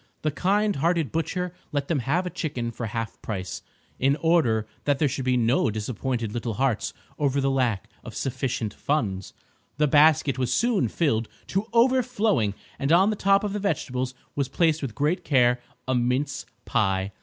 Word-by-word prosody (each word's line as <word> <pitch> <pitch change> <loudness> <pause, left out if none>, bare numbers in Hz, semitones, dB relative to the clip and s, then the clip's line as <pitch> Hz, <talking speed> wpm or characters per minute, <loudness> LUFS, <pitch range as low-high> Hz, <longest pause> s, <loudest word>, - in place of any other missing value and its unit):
The 155 - +1
kind 205 +5 +1
hearted 165 0 +1
butcher 180 +2 -2 0.2
let 145 -1 -1
them 160 -4 +1
have 155 +9 0
a 180 - -3
chicken 125 -7 -3
for 115 0 -5
half 115 +1 -5
price, 95 -4 -4 0.4
in 135 +2 +3
order 145 -9 +2 0.2
that 145 -2 +2
there 150 - +2
should 135 -1 -3
be 125 -1 +2
no 120 +2 +2
disappointed 110 +1 -3
little 115 -2 -3
hearts 130 -3 0 0.3
over 140 -1 +1
the 135 0 +1
lack 125 -7 0 0.2
of - - -9
sufficient 125 -5 -2
funds. 100 -10 -2 0.4
The 150 - +3
basket 145 -2 +4
was 125 -2 0
soon 235 -4 +2
filled 115 -9 0 0.2
to 195 +3 -1
overflowing 230 - +2 0.2
and 140 +2 0
on 190 +5 +5
the - - -1
top 195 0 +3
of 205 -1 -2
the 210 - -2
vegetables 130 -10 -2 0.2
was 140 -2 -1
placed 160 +1 +2
with 130 -6 -4
great 155 +5 0
care 125 -5 +3 0.3
a 130 - +1
mince 130 +3 0 0.2
pie. 95 -2 +1
135 Hz, 175 wpm, -25 LUFS, 120-170 Hz, 0.4 s, on